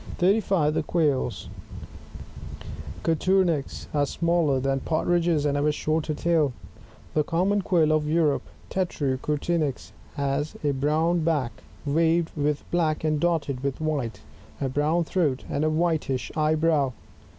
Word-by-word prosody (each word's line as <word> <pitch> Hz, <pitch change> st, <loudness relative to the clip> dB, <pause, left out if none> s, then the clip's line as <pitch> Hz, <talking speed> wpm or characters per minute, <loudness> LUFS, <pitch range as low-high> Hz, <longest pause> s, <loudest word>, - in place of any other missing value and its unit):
] -, -, -9 dB
35. 185 Hz, -5 st, +2 dB
The -, -, +1 dB
Quails. 145 Hz, -, 0 dB, 0.8 s
— -, -, -11 dB
Coturnix, 170 Hz, -2 st, +1 dB
— -, -, -21 dB
are 145 Hz, -1 st, +2 dB
smaller 165 Hz, -4 st, +1 dB
than 135 Hz, +1 st, 0 dB
Partridges, 165 Hz, +1 st, +1 dB
and 145 Hz, -1 st, +1 dB
have 145 Hz, +1 st, +1 dB
a -, -, +4 dB
shorter 155 Hz, +1 st, -1 dB
tail. 155 Hz, -4 st, +2 dB, 0.6 s
The 155 Hz, -, +2 dB
Common 190 Hz, +6 st, +1 dB
Quail 165 Hz, -5 st, +2 dB
of 155 Hz, -1 st, +1 dB
Europe, 155 Hz, -3 st, +2 dB, 0.2 s
— -, -, -25 dB
Tclrao 145 Hz, -8 st, -1 dB
cotnrnix, 150 Hz, 0 st, -1 dB
— -, -, -25 dB
has 140 Hz, +1 st, -1 dB
a 145 Hz, -, +2 dB
brown 155 Hz, +5 st, +1 dB
back, 150 Hz, -7 st, +1 dB, 0.3 s
waved 165 Hz, +3 st, +2 dB
with 150 Hz, -1 st, 0 dB
bkick 160 Hz, -3 st, +1 dB
and 155 Hz, -1 st, +1 dB
dotted 155 Hz, -6 st, 0 dB
with 140 Hz, -1 st, -2 dB
white, 140 Hz, -9 st, -2 dB, 0.4 s
a 135 Hz, -, 0 dB
brown 150 Hz, +5 st, +1 dB
throat, 155 Hz, -6 st, 0 dB
and 145 Hz, -, -1 dB
a 155 Hz, -, +3 dB
whitish 155 Hz, -6 st, 0 dB
eye 155 Hz, 0 st, +2 dB
brow. 155 Hz, -5 st, +2 dB
155 Hz, 150 wpm, -25 LUFS, 145-170 Hz, 0.8 s, a